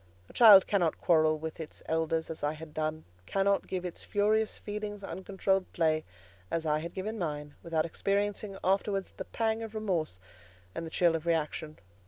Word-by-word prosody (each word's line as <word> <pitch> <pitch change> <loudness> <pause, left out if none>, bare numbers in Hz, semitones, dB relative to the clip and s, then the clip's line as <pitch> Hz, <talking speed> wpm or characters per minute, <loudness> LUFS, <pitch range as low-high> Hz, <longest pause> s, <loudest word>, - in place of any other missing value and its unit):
A - - -14
child 210 -5 +9
cannot 175 -6 +1
quarrel 155 -2 +3
with 160 +1 -6
its 160 - -8
elders, 160 0 0
as 160 - -7
I 145 +1 +1
had 155 0 -10
done; 155 0 -2 0.2
cannot 195 0 +1
give 185 -1 -3
its 175 - -5
furious 215 +1 +1
feelings 205 -1 -5
uncontrolled 190 0 -1
play, 155 -2 +1 0.4
as 165 -1 -2
I 150 0 +2
had 170 +2 -7
given 215 +4 -4
mine, 150 -4 -4
without 160 -2 0
experiencing 200 +3 -1
afterwards 195 +1 0
the - - -6
pang 225 -1 -1
of 225 -1 -7
remorse 175 - -1 0.5
and 165 - -5
the - - -6
chill 170 0 +3
of 165 +1 -4
reaction. 155 -1 -1
175 Hz, 175 wpm, -30 LUFS, 160-200 Hz, 0.5 s, child